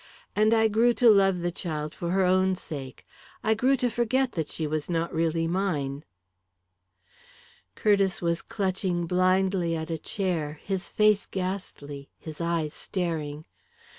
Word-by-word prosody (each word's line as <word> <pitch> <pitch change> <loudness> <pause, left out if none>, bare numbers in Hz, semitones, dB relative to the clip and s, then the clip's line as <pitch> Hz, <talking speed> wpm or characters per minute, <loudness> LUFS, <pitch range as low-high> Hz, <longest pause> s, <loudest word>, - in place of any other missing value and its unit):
And 215 +1 +4
I 225 -1 +5
grew 230 +3 +3
to 235 -1 +6
love 195 -3 +4
the 175 0 -1
child 155 -3 -4
for 170 - -4
her 190 +1 +2
own 185 +1 +3
sake 140 -7 -8 0.4
I 220 - +3
grew 255 +5 +3
to 250 - +1
forget 245 +3 +1
that 160 -3 -2
she 160 - -3
was 155 +1 -2
not 170 0 -1
really 165 0 +1
mine 155 -6 -1 0.8
" 90 +1 -28
Curtiss 200 -3 +2
was 170 -1 0
clutching 185 -3 -1
blindly 185 -1 +2
at 160 +1 -4
a 160 - -2
chair, 160 -6 -2
his 190 -2 -3
face 210 -1 +3
ghastly, 180 -7 -5
his 155 0 -8
eyes 165 -2 -1
staring. 160 -5 -3
180 Hz, 150 wpm, -27 LUFS, 160-195 Hz, 0.8 s, to